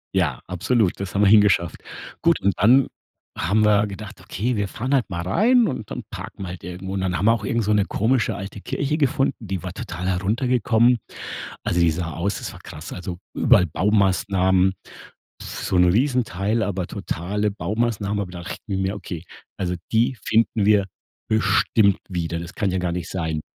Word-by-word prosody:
Ja, 80 -10 +1
absolut, 95 +3 +1
das 100 -1 -5
haben 100 - +1
wir 105 - +5
hingeschafft. 100 -4 +4 0.4
Gut - - +3
und 100 0 +2
dann 125 +5 +5 0.5
haben 100 +7 +2
wir 105 -1 +4
gedacht: 105 +1 -8
„Okay, 120 +6 -2
wir 100 -1 0
fahren 125 +7 -3
halt 130 -4 +2
mal 85 -2 -3
rein 225 - +3
und 125 -7 -5
dann - - -4
wir - - -7
parken 95 - -7
halt 90 0 -8
irgendwo.“ 90 +2 -6
Und 95 - -1
dann 90 -1 -1
haben 95 - -1
wir 115 - +6
auch 110 -3 -3
irgend 115 +3 0
so 105 - 0
'ne 105 -2 +3
komische 115 +3 +1
alte 95 +1 -7
Kirche 145 +8 -2
gefunden, 140 -2 +1
die 95 -5 -4
war 90 - -5
total 90 0 -5
heruntergekommen. 115 +4 +2 0.7
Also 85 - 0
die 85 -1 +4
sah 85 +1 -3
aus 95 +3 -2
das - - -6
war - - -12
krass. 75 +2 -9
Also 90 -1 -6 0.2
überall 90 - +4
Baumaßnahmen, 95 0 +2 0.7
so - - -3
'n 90 - +6
Riesenteil, 110 0 +1
aber 95 -3 -3
totale 105 +5 -2
Baumaßnahmen, 105 +2 -1
aber 95 -3 -4
da 85 -1 -7
dachten 95 +2 -4
wir: 95 +2 -1
„Okay, 90 -5 -6 0.3
also 90 -2 -2 0.2
die 120 +3 +2
finden 110 -1 +2
wir 105 -2 +4 0.4
bestimmt 110 -2 +3
wieder.“ 85 -2 -3
Das 85 +1 -8
kann 100 -4 0
ja 95 - 0
gar 90 -1 -1
nicht 85 0 -4
sein. 80 -4 -2
100 Hz, 185 wpm, -23 LUFS, 90-110 Hz, 0.7 s, wir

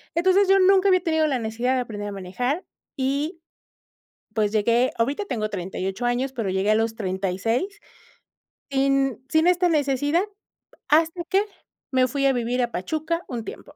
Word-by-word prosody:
entonces 375 +3 +4
yo 390 0 +5
nunca 385 +1 +5
había 370 -1 +4
tenido 320 -2 +2
la 265 -4 0
necesidad 235 +4 -1
de - - +1
aprender 205 -3 -5
a - - -6
manejar 245 - -3 0.3
y 285 +5 -1 0.9
pues, 210 -2 +1
llegué, 235 +4 +2
ahorita 275 - 0
tengo 215 - -2
38 190 +3 -4
años, 250 +2 0
pero 225 -6 -2
llegué 190 +3 +1
a - - +4
los 225 0 0
36. 195 - -1 1.0
Sin 275 -2 +1
sin 315 +2 +3
esta 360 0 +3
necesidad, 290 +2 +1 0.7
hasta 325 +3 +3
qué, 390 +3 +3 0.5
me 255 -1 +4
fui 275 +2 -1
a 270 - +4
vivir 245 +1 -1
a 240 -1 -1
Pachuca 315 - -2
un 235 -3 -4
tiempo - - -9
260 Hz, 160 wpm, -24 LUFS, 220-320 Hz, 1.0 s, yo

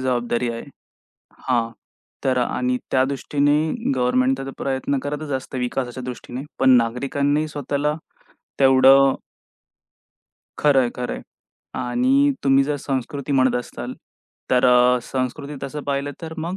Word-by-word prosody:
जबाबदारी 120 -1 0
आहे. 115 0 -5 0.9
हां, 115 -2 +1 0.5
तर 130 -1 +2
आणि 125 +1 0
त्या 130 - +3
दृष्टीने 145 - 0
गव्हर्नमेंट 125 +1 +2
तर 135 0 -5
प्रयत्न 135 +1 -1
करतचं 145 -1 -3
असतं 130 0 -7
विकासाच्या 125 0 -3
दृष्टीने 125 +1 -6 0.2
पण 130 - +4
नागरिकांनीही 140 +6 0
स्वतःला 145 +1 -2 0.7
तेवढं 135 0 +6 1.4
खरंय-खरंय. 130 -4 +1 0.5
आणि 265 - +2
तुम्ही 135 0 +4
जर 145 +1 -1
संस्कृती 140 +1 -3
म्हणत 130 -2 +3
असताल 125 - -6 0.6
तर 125 -1 +3
अ, 125 0 +5
संस्कृती 135 +4 -4
तसं 140 +2 -5
पाहिलं 140 0 -2
तर 160 0 -6
मग 170 +4 -3
135 Hz, 115 wpm, -22 LUFS, 125-145 Hz, 1.4 s, तेवढं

